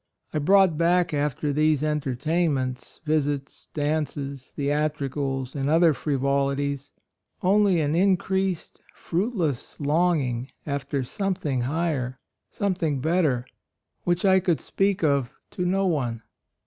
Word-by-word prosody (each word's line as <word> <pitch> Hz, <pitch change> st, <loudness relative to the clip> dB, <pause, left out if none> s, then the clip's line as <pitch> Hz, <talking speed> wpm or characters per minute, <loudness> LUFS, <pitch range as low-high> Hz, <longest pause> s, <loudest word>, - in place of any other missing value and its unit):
I 155 Hz, -, +1 dB
brought 185 Hz, 0 st, +4 dB
back 175 Hz, 0 st, +3 dB
after 145 Hz, 0 st, 0 dB
these 155 Hz, 0 st, +2 dB
entertainments, 145 Hz, -2 st, -1 dB
visits, 145 Hz, -2 st, -1 dB
dances, 145 Hz, -3 st, -2 dB
theatricals, 140 Hz, -2 st, -1 dB
and 140 Hz, -1 st, -1 dB
other 165 Hz, 0 st, +5 dB
frivolities, 140 Hz, 0 st, -1 dB, 0.5 s
only 195 Hz, -1 st, +4 dB
an 150 Hz, +1 st, 0 dB
in 190 Hz, +1 st, +4 dB
creased, 190 Hz, -2 st, -2 dB
fruitless 175 Hz, -, -2 dB
longing 145 Hz, -5 st, +1 dB, 0.2 s
after 140 Hz, -1 st, -2 dB
something 155 Hz, -, -2 dB
higher, 135 Hz, -2 st, -1 dB, 0.3 s
something 175 Hz, -8 st, -1 dB
better, 150 Hz, -5 st, +1 dB, 0.6 s
which 175 Hz, +2 st, 0 dB
I 190 Hz, -1 st, +6 dB
could 175 Hz, -3 st, +1 dB
speak 195 Hz, -1 st, 0 dB
of 140 Hz, -5 st, +2 dB, 0.2 s
to 180 Hz, -, -2 dB
no 195 Hz, +2 st, +1 dB
one. 125 Hz, -10 st, -1 dB
150 Hz, 110 wpm, -25 LUFS, 140-175 Hz, 0.6 s, I